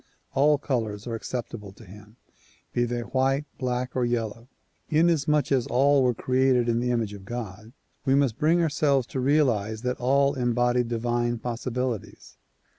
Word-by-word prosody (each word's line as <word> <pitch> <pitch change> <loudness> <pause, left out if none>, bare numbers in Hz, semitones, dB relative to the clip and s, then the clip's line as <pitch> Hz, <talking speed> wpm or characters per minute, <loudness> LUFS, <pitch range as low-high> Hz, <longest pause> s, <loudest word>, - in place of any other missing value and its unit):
All 145 +2 +4
colors 110 -7 -3
are 120 - -4
acceptable 115 -3 -5
to 110 - -15
him, 105 +3 -14 0.6
be 120 - +1
they 120 0 -2
white, 135 +4 0
black 125 0 -2
or 130 - +1
yellow. 115 -1 -2 0.4
Inasmuch 150 -3 +2
as 130 -3 +2
all 140 +2 +3
were 125 -2 +2
created 130 0 +2
in 115 0 +1
the 125 +1 -1
image 115 -4 -1
of 100 -2 -10
God 110 0 -7 0.3
we 135 - +2
must 135 -5 +1
bring 165 +3 +3
ourselves 145 -4 +2
to 130 - -5
realize 120 -6 +1
that 125 0 -2
all 140 +3 +3
embody 120 -1 +1
divine 120 0 -1
possibilities. 120 -2 -4
125 Hz, 155 wpm, -26 LUFS, 115-135 Hz, 0.6 s, All